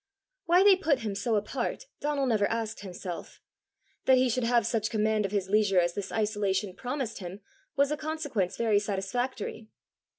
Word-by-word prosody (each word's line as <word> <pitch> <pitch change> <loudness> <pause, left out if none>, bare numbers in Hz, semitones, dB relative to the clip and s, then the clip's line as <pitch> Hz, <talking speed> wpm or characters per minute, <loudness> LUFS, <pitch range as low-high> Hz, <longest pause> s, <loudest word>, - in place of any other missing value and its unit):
Why 355 +3 +6
they 400 -1 +8
put 320 -9 +1
him 215 -3 -2
so 225 +3 0
apart, 235 - -2
Donal 290 -2 0
never 215 -5 +2
asked 225 -1 -3
himself; 180 -2 -7 0.7
that 260 -1 +6
he 255 0 +3
should 245 +1 0
have 235 -2 +3
such 220 -2 0
command 215 -2 +1
of - - -12
his 200 -2 -1
leisure 205 -2 +3
as 175 0 +1
this 195 0 -5
isolation 205 -3 0
promised 250 -3 -4
him 185 +2 -7 0.3
was 280 0 +3
a 300 - 0
consequence 290 - -2
very 220 -3 +3
satisfactory. 215 +3 -3
220 Hz, 170 wpm, -29 LUFS, 205-260 Hz, 0.7 s, they